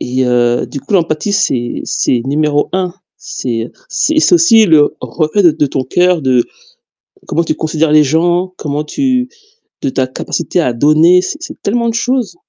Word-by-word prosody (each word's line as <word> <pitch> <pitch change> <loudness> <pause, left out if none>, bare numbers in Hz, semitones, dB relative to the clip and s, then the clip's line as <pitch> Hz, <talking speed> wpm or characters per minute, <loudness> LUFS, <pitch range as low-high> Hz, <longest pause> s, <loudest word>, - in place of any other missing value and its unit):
Et 130 +1 -1
heu, 120 -1 +1
du 140 - -7
coup 140 - -8
l'empathie 170 +2 0
c'est 120 -10 -1
c'est 120 - 0
numéro 145 +1 0
1. 185 -2 -1 0.2
C'est, 115 -3 -4
heu, - - -18 0.2
c'est 315 +1 0
c'est 350 - +4
aussi 230 -11 +5
le 155 -4 +3
reflet 165 +5 -1
de 170 - +6
de 150 -1 0
ton 135 -1 -2
coeur, 180 +3 +1
de 130 -3 +2 0.8
comment 170 - 0
tu 155 - -1
considères 155 0 -1
les 150 0 +5
gens, 175 +5 0
comment 150 0 -3
tu 255 - -1 0.5
de - - 0
ta 130 0 -1
capacité 130 +6 -3
à 125 -7 0
donner. 155 +8 +4
C'est 245 +11 -5
c'est 335 - -9
tellement 235 +3 0
de 230 - -2
choses. 240 -5 -1
155 Hz, 185 wpm, -13 LUFS, 135-190 Hz, 0.8 s, de